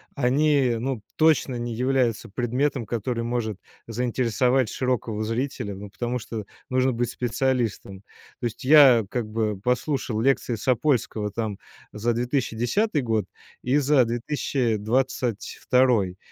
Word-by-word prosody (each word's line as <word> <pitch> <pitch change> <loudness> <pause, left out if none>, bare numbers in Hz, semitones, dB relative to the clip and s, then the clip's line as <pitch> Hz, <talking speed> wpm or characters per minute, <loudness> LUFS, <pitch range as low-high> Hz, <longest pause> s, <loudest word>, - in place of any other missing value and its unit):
они, 140 -1 +2
ну, 125 -1 -3
точно 155 -5 +3
не 120 -1 -3
являются 125 -2 0
предметом, 125 +4 -1
который 115 +2 -2
может 115 -4 -2 0.3
заинтересовать 125 +2 +1
широкого 115 -3 -2
зрителя, 115 -3 -3
ну, 100 +1 -9
потому 120 +4 -3
что 110 -2 -6 0.3
нужно 130 0 +2
быть 120 0 -1
специалистом. 120 -5 -1 0.4
То - - -2
есть 115 - -8
я 135 -6 +7
как 115 -3 -3
бы 110 -2 -1
послушал 125 -1 -1
лекции 130 -1 +1
Сапольского 115 -3 0
там 105 -1 -3 0.4
за 115 +3 0
2010 125 - 0
год 110 -3 0 0.4
и 130 +3 +1
за 145 -2 +4
2022. 120 -3 0
120 Hz, 120 wpm, -24 LUFS, 110-130 Hz, 0.4 s, я